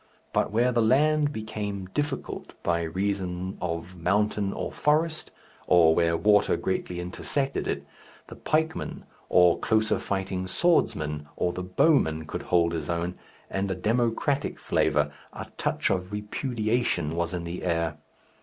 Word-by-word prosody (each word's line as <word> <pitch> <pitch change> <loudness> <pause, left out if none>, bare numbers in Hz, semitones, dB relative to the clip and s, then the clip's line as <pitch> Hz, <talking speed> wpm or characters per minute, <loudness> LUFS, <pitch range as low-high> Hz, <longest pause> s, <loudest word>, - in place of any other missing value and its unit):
But - - +2
where 120 +4 +2
the 120 -1 +2
land 145 +5 +3
became 105 -5 -4
difficult 145 -2 -3
by 85 -1 +1
reason 95 +1 -2
of 85 +1 -4
mountain 100 +3 +1
or - - -4
forest, 155 +2 +1 0.4
or 85 -3 +6
where 85 0 +2
water 105 +1 +4
greatly 90 -1 -2
intersected 135 +10 -2
it, - - -2 0.4
the - - -11
pikeman 160 +1 -1 0.3
or 90 -1 +5
closer 110 -1 +2
fighting 95 -1 -2
swordsman 75 - +1
or 90 0 0
the 90 - -4
bowman 90 - +2
could - - -5
hold 85 -1 +2
his 80 - -3
own, 85 +1 -1 0.3
and 95 0 -2
a 95 - -1
democratic 120 +7 0
flavour, - - +1 0.2
a - - -6
touch - - 0
of 90 +1 -1
repudiation, 105 - -1
was 85 +1 -1
in 85 - -4
the 85 +2 -5
air. 85 -3 -1
95 Hz, 140 wpm, -27 LUFS, 85-115 Hz, 0.4 s, or